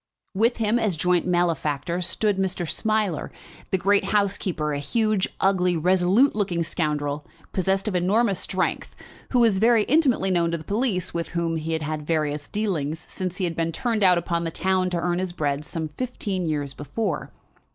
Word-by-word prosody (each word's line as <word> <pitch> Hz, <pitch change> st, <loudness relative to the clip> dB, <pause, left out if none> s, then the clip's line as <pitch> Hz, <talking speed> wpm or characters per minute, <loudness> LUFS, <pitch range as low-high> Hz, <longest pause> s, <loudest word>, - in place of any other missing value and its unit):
With 230 Hz, +5 st, +2 dB
him, 225 Hz, +1 st, +2 dB
as 215 Hz, -6 st, +1 dB
joint 180 Hz, +2 st, +1 dB
malefactor, 170 Hz, -1 st, 0 dB
stood 205 Hz, +3 st, +1 dB
Mr. 185 Hz, -2 st, -1 dB
Smiler, 215 Hz, -3 st, -1 dB, 0.4 s
the 190 Hz, -, +2 dB
great 200 Hz, +2 st, +2 dB
housebreaker, 190 Hz, -7 st, 0 dB
a 145 Hz, -, -2 dB
huge, 215 Hz, +7 st, +1 dB
ugly, 180 Hz, -2 st, +2 dB
resolute 185 Hz, -, +3 dB
looking 185 Hz, -5 st, 0 dB
scoundrel, 150 Hz, -3 st, -1 dB, 0.3 s
possessed 190 Hz, +2 st, 0 dB
of 210 Hz, -, -1 dB
enormous 195 Hz, +3 st, +2 dB
strength, 185 Hz, -1 st, -2 dB, 0.3 s
who 255 Hz, -, +1 dB
was 225 Hz, -5 st, +4 dB
very 225 Hz, 0 st, +5 dB
intimately 255 Hz, -8 st, +2 dB
known 170 Hz, -2 st, +2 dB
to 170 Hz, -, -1 dB
the 160 Hz, -, -10 dB
police, 205 Hz, -1 st, -1 dB
with 170 Hz, -1 st, -2 dB
whom 165 Hz, -1 st, 0 dB
he 160 Hz, +1 st, -3 dB
had 160 Hz, -1 st, -1 dB
had 155 Hz, 0 st, -3 dB
various 150 Hz, -3 st, -1 dB
dealings 165 Hz, -8 st, -2 dB
since 185 Hz, -1 st, -5 dB
he -, -, -2 dB
had 170 Hz, -2 st, -1 dB
been 165 Hz, 0 st, -1 dB
turned 225 Hz, +4 st, -1 dB
out 180 Hz, -2 st, +6 dB
upon 170 Hz, 0 st, -1 dB
the 165 Hz, -, -1 dB
town 185 Hz, +2 st, 0 dB
to 180 Hz, -, -1 dB
earn 175 Hz, +1 st, 0 dB
his 185 Hz, -1 st, -3 dB
bread 145 Hz, -3 st, -1 dB
some 160 Hz, 0 st, -4 dB
fifteen 195 Hz, -1 st, -3 dB
years 145 Hz, -3 st, -2 dB
before. 145 Hz, -, -3 dB
180 Hz, 180 wpm, -24 LUFS, 165-205 Hz, 0.4 s, out